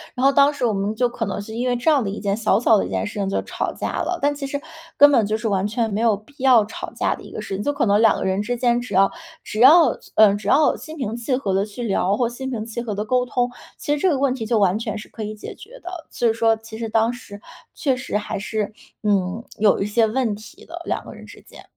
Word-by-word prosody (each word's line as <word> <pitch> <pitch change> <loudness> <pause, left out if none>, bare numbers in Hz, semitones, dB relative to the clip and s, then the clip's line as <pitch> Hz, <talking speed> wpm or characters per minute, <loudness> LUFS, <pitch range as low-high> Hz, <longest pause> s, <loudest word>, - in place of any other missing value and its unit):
然 255 +1 0
后 275 - +6
当 280 +1 +5
时 285 -4 -2
我 225 - +1
们 200 +2 -2
就 245 +2 +2
可 235 -2 -4
能 195 - -3
是 205 +2 -8
因 240 +3 -2
为 245 - +1
这 245 +7 +2
样 280 -4 +3
的 200 - -2
一 200 - -5
件 200 -1 -1
小 215 -2 +2
小 225 -1 +4
的 - - -1
一 - - -9
件 - - -1
事 210 0 -6
情 195 -1 -1
就 195 - 0
吵 - - -3
架 - - -4
了。 360 0 -2
但 290 +1 +1
其 285 -1 -5
实 285 +1 -3 0.4
根 290 0 +8
本 235 -5 +4
就 215 +1 0
是 225 - -3
完 195 -1 0
全 225 0 -1
没 210 - -1
有 225 -3 +3
必 215 +8 -21
要 255 -5 +5
吵 210 - -7
架 - - 0
的 - - -10
一 - - -12
个 - - -6
事 - - -6
情， 195 - -2
就 290 - +1
可 280 -2 0
能 205 0 +3
两 225 - +5
个 - - -3
人 190 +1 0
之 240 +3 -2
间， 240 0 +2
只 245 - -6
要 195 +1 +4 0.3
只 215 - -6
要 285 +1 +7 0.2
嗯， 210 -2 +6
只 - - -8
要 305 +1 +4
心 315 +1 -10
平 230 -6 -3
气 240 +2 -1
和 210 -7 -2
地 195 +1 +2
去 210 +3 -7
聊， 200 -2 +1
或 240 - +1
心 255 +3 -6
平 225 -4 -4
气 230 +1 -5
和 220 -4 -4
地 210 +2 -3
沟 250 +2 +1
通， 245 0 0 0.3
其 290 - -1
实 295 - -1
这 380 - +3
个 295 - +1
问 270 -1 +1
题 255 -4 -5
就 230 0 +2
完 200 0 +2
全 220 -2 -4
是 210 - -9
可 225 - -10
以 215 0 -5
解 210 - -8
决 - - -14
的。 355 -3 -8
其 240 - -3
实 225 - +4
说， 225 0 +2
其 220 0 -11
实 225 -1 -3
当 225 +2 +2
时 225 -4 -11 0.4
确 270 -4 0
实 250 -4 -3
还 210 - -4
是， 210 0 -3 0.3
嗯， 200 +1 0
有 205 -2 +3
一 - - +1
些 220 +2 +2
问 230 -1 -1
题 215 +2 -14
的， 345 +1 -8
两 - - -2
个 - - -9
人 - - -12
之 - - -14
间。 - - -15
225 Hz, 320 characters per minute, -22 LUFS, 210-255 Hz, 0.4 s, 根